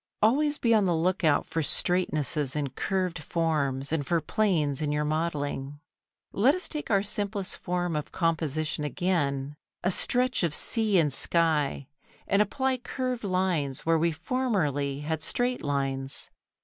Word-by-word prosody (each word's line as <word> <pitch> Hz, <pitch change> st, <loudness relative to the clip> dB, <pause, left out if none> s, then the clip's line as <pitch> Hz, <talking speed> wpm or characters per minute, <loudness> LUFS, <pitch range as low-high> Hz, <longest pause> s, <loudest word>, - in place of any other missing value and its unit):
#Always 290 Hz, +7 st, +3 dB
be 230 Hz, -1 st, +2 dB
on 215 Hz, -3 st, +4 dB
the 175 Hz, -2 st, +2 dB
look 180 Hz, +4 st, 0 dB
out 150 Hz, -3 st, +3 dB
for 165 Hz, -, -2 dB
straightnesses 150 Hz, -4 st, +1 dB
in 145 Hz, -2 st, -1 dB
curved 185 Hz, +3 st, -2 dB
forms 150 Hz, -4 st, -1 dB
and 160 Hz, -2 st, 0 dB
for 170 Hz, +5 st, +1 dB
planes 155 Hz, -5 st, 0 dB
in 150 Hz, -1 st, 0 dB
your 150 Hz, 0 st, 0 dB
modelling.# 145 Hz, -3 st, -2 dB, 0.5 s
Let 250 Hz, +9 st, +3 dB
us 365 Hz, -, -2 dB
take 300 Hz, -1 st, -5 dB
our 200 Hz, -2 st, +3 dB
simplest 205 Hz, -1 st, -2 dB
form 175 Hz, -2 st, -2 dB
of 150 Hz, -1 st, -4 dB
composition 155 Hz, -3 st, -1 dB
again, 145 Hz, -3 st, -1 dB, 0.3 s
a 185 Hz, -, +2 dB
stretch 250 Hz, +6 st, +1 dB
of 165 Hz, -4 st, +1 dB
sea 220 Hz, -4 st, +3 dB
and 150 Hz, -5 st, +3 dB
sky, 150 Hz, -3 st, +1 dB, 0.4 s
and 200 Hz, +1 st, +3 dB
apply 260 Hz, +5 st, 0 dB
curved 250 Hz, 0 st, -3 dB
lines 180 Hz, -8 st, 0 dB
where 165 Hz, 0 st, +3 dB
we 170 Hz, +1 st, +2 dB
formerly 160 Hz, -, -1 dB
had 155 Hz, +1 st, -2 dB
straight 245 Hz, +9 st, 0 dB
lines. 135 Hz, -1 st, -3 dB
165 Hz, 150 wpm, -27 LUFS, 145-200 Hz, 0.5 s, on